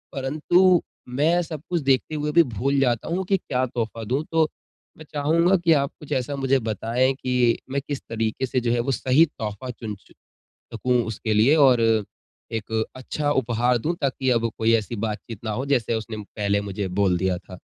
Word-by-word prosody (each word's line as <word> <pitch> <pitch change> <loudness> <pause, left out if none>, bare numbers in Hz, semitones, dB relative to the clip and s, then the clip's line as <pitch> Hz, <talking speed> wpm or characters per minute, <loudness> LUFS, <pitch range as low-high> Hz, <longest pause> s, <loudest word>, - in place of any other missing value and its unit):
परंतु 165 +7 +3 0.3
मैं 155 +7 +2
सब 155 -3 -7
कुछ 175 -3 0
देखते 135 +3 +1
हुए 150 0 -1
भी 170 +2 +6
भूल 135 +3 -1
जाता 120 -4 +1
हूँ 185 +3 -1
की 195 +1 +2
क्या 130 -6 -1
तोहफ़ा 115 -2 -4
दूँ, 130 +8 -1
तो 160 -1 +3 0.5
मैं 155 - -11
चाहूँगा 165 +6 +3
की 170 -2 +3
आप 140 -1 +1
कुछ 150 - -12
ऐसा 130 +3 -1
मुझे 135 -1 +2
बताए 115 +3 0
की 125 -3 +1
मैं 140 0 0
किस 145 -2 -3
तरीके 115 +2 -1
से 130 0 0
जो 115 0 0
है 120 - +1
वो 135 - -1
सही 135 +4 +4
तोहफ़ा 115 -4 -6
चुन 110 -3 -6
चु - - -21 0.6
सकूँ 125 -1 +1
उसके 110 0 -2
लिए 115 +8 +5
और 130 -5 +5 0.7
एक 110 0 -1
अच्छा 145 +3 -2
उपहार 120 -2 +1
दूँ 155 +9 -1
ताकि 135 -2 0
अब 115 -1 +1
कोई 115 0 +3
ऐसी 110 +1 -4
बातचीत 110 +1 -6
ना 110 - -2
हो 130 +6 -3
जैसे 125 -5 +1
उसने 110 0 -4
पहले 100 0 -1
मुझे 100 -1 -4
बोल 95 -3 +3
दिया 95 -1 0
था। 90 0 -12
130 Hz, 195 wpm, -24 LUFS, 115-145 Hz, 0.7 s, भी